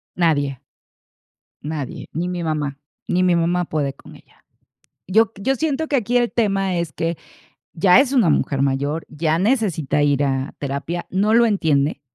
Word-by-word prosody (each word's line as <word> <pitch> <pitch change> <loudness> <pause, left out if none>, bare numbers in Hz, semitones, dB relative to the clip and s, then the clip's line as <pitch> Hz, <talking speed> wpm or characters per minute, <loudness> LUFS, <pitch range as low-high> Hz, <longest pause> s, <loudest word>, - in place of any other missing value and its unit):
Nadie. 145 -6 +1 1.0
Nadie, 150 -2 -5
ni 170 +3 -2
mi 175 -1 -3
mamá, 150 -3 -2 0.3
ni 180 +1 +1
mi 180 -1 +3
mamá 175 +1 +1
puede 145 -4 -2
con - - -15
ella. - - -22 0.6
Yo 220 +5 +4
q 200 - -13
yo 265 +6 +2
siento 315 +2 -1
que 285 - +1
aquí 245 0 0
el 240 -1 +2
tema 195 -5 0
es 170 -3 -3
que 165 +3 -2 0.6
ya 180 +6 +5
es 275 -1 +2
una 235 -11 +4
mujer 140 -2 +1
mayor, 140 +3 -1
ya 155 +1 0
necesita 190 - +1
ir 145 -1 +2
a 135 +1 -1
terapia, 145 +5 -4
no 205 +4 +1
lo 235 +1 +6
entiende, 155 -9 +1
170 Hz, 170 wpm, -21 LUFS, 145-205 Hz, 1.0 s, lo